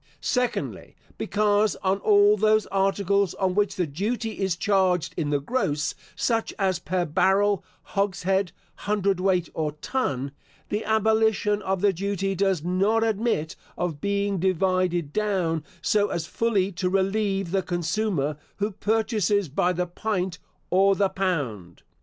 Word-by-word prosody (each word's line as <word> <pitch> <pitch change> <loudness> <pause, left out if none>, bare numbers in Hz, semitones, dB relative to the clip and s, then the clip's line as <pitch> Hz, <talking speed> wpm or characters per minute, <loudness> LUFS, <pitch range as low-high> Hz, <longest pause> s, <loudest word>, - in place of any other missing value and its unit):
Secondly. 250 -2 -2 0.2
Because, 210 0 +2
on 190 +1 +1
all 205 0 +5
those 215 +1 +3
articles 195 -1 +1
on 190 -2 0
which 205 0 +1
the 180 - 0
duty 215 - -3
is 190 -3 0
charged 185 -3 +1
in 155 -4 -2
the 145 -1 +1
gross, 150 - -1 0.2
such 225 +5 0
as 190 -3 +1
per 180 0 -1
barrel, 195 +5 +2 0.2
hogshead, 195 -2 0 0.4
hundred 200 -2 +1
weight, 180 -3 +1
or 155 -2 -2
ton, 140 - -2 0.4
the 210 +1 -1
abolition 220 -1 +2
of 190 -2 -1
the 200 -1 +3
duty 195 +1 -2
does 190 -4 0
not 195 +6 +2
admit 220 -8 0 0.2
of 165 -5 -3
being 200 -1 0
divided 185 -3 +1
down 185 -7 0 0.2
so 205 +4 +2
as 165 - -2
fully 200 -2 0
to 180 0 -1
relieve 195 -1 0
the 195 0 +2
consumer, 175 -4 -1 0.2
who 205 +1 -1
purchases 210 - 0
by 175 +6 +1
the 180 0 -1
pint, 185 0 -3 0.3
or 195 +2 +4
the 195 0 +2
pound. 135 - -3
195 Hz, 140 wpm, -25 LUFS, 180-205 Hz, 0.4 s, all